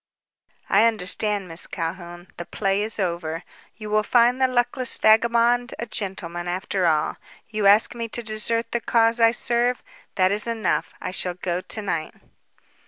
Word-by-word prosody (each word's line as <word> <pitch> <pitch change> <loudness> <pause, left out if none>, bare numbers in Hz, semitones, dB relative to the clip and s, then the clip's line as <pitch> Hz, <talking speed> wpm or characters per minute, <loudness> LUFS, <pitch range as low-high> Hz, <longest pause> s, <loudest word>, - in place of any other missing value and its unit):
"I 210 +3 +4
understand, 205 -1 -1
Miss 165 0 0
Calhoun. 175 +1 -6
The 175 - -7
play 195 0 -1
is 215 +1 -1
over. 170 -3 -3 0.3
You 215 -1 -8
will 215 0 +3
find 245 +3 +3
the 260 - +5
luckless 250 0 0
vagabond 235 +2 +3
a 235 - -4
gentleman, 185 -5 -5
after 185 0 -1
all. 155 -2 0 0.3
You 215 -2 +1
ask 205 +4 +5
me 230 -1 -5
to 235 +1 -5
desert 220 +1 -1
the 235 - -1
cause 230 +1 +2
I 230 0 +6
serve. 240 +1 0 0.3
That 185 -1 +3
is 210 +2 +2
enough. 225 -4 -1
I - - -5
shall 180 -1 -2
go 180 0 -3
to 215 - -3
night." 165 -5 -3
210 Hz, 165 wpm, -23 LUFS, 180-235 Hz, 0.3 s, I